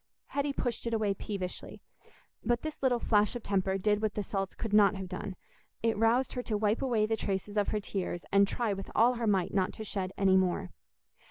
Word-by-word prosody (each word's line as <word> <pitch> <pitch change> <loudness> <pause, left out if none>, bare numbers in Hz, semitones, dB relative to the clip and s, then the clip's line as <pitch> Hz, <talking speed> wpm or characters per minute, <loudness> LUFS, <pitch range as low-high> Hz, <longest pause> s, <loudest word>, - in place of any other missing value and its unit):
Hetty 285 0 0
pushed 245 -3 -2
it 230 - 0
away 210 -2 +1
peevishly; 195 -2 -5 0.6
but 240 +1 +1
this 310 -1 -5
little 255 -2 +3
flash 210 -1 +2
of 240 - -5
temper 190 -1 0
did 210 +2 +1
what 215 -2 -1
the 210 - -1
salts 195 0 -3
could 225 -3 -4
not 205 -1 +6
have 190 -1 -5
done—it 205 +4 -5
roused 230 +4 +2
her 250 - -2
to 220 -3 -2
wipe 210 +1 +1
away 235 -5 +2
the 225 +1 0
traces 205 -1 -3
of 205 -1 +2
her 215 - 0
tears, 190 -3 -4
and 200 0 +5
try 225 0 -1
with 195 0 -6
all 235 +3 +5
her 235 -2 -2
might 190 -4 +1
not 190 -2 +1
to 220 - -6
shed 195 -3 -3
any 190 -1 +4
more. 180 - 0
210 Hz, 210 wpm, -31 LUFS, 195-230 Hz, 0.6 s, not